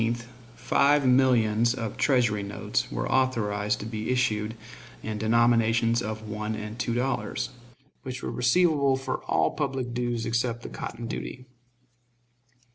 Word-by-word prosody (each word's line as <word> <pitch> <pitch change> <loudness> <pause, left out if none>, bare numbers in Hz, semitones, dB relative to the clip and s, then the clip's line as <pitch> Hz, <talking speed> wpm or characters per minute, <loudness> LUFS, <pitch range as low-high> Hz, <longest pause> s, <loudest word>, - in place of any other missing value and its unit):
On 115 - +2
April 120 +1 0
17th 120 0 -11 0.3
five 145 0 +3
millions 120 -3 +4
of 115 -5 -4
Treasury 120 -7 +2
notes 100 0 -2
were - - -2
authorized 105 -5 +1
to - - -5
be 110 -1 -4
issued 110 -4 0 0.5
in 110 -1 -4
denominations 115 +1 +3
of 110 -1 -5
one 105 +1 -3
and 105 +2 -7
two 115 - -1
dollars, 130 +2 -1 0.5
which 130 -1 -6
were - - -3
receivable 140 +1 +3
for 130 -1 -4
all - - +2
public 135 -5 -3
dues 120 -1 -1
except 120 0 -1
the - - -6
cotton 120 - -6
duty. 125 +2 -6
120 Hz, 145 wpm, -27 LUFS, 110-130 Hz, 0.5 s, millions